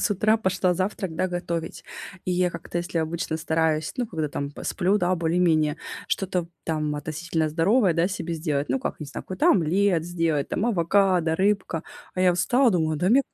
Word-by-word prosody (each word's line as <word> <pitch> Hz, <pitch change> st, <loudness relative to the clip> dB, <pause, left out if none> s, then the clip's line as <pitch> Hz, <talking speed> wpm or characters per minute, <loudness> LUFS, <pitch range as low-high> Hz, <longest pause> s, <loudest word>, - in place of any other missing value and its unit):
с -, -, +1 dB
утра 215 Hz, +2 st, +3 dB
пошла 185 Hz, -3 st, +1 dB
завтрак, 185 Hz, -1 st, -2 dB
да, 185 Hz, +3 st, 0 dB
готовить. 170 Hz, -2 st, -4 dB, 0.4 s
И -, -, -2 dB
я 180 Hz, 0 st, +2 dB
как-то, 170 Hz, +1 st, -5 dB
если 175 Hz, -1 st, -2 dB
обычно 160 Hz, 0 st, -2 dB
стараюсь, 160 Hz, -1 st, 0 dB
ну, 245 Hz, -3 st, -1 dB
когда 160 Hz, -6 st, -3 dB
там 140 Hz, 0 st, -4 dB
посплю, 190 Hz, +6 st, 0 dB
да, 180 Hz, -1 st, +2 dB
более-менее, 165 Hz, -3 st, +2 dB, 0.3 s
что-то, 180 Hz, -3 st, -1 dB, 0.2 s
там, 155 Hz, -2 st, -1 dB
относительно 160 Hz, +1 st, -2 dB
здоровое, 190 Hz, +6 st, +3 dB
да, 170 Hz, +2 st, +2 dB
себе 175 Hz, -3 st, -4 dB
сделать. 150 Hz, -3 st, -1 dB
Ну -, -, +1 dB
как, 255 Hz, -, -4 dB
не 150 Hz, -, -5 dB
знаю, 140 Hz, -, -7 dB
какой-то 185 Hz, 0 st, +1 dB
омлет 180 Hz, 0 st, +2 dB
сделать, 165 Hz, -4 st, 0 dB
там 200 Hz, -, -1 dB
авокадо, 180 Hz, -4 st, +2 dB
рыбка. 195 Hz, -4 st, 0 dB, 0.3 s
А 185 Hz, -, -2 dB
я 185 Hz, -1 st, +5 dB
встала, 245 Hz, +8 st, +3 dB
думаю: 160 Hz, -5 st, +1 dB
"Да 180 Hz, +5 st, +1 dB
нет, 270 Hz, +4 st, +5 dB
175 Hz, 185 wpm, -25 LUFS, 160-190 Hz, 0.4 s, я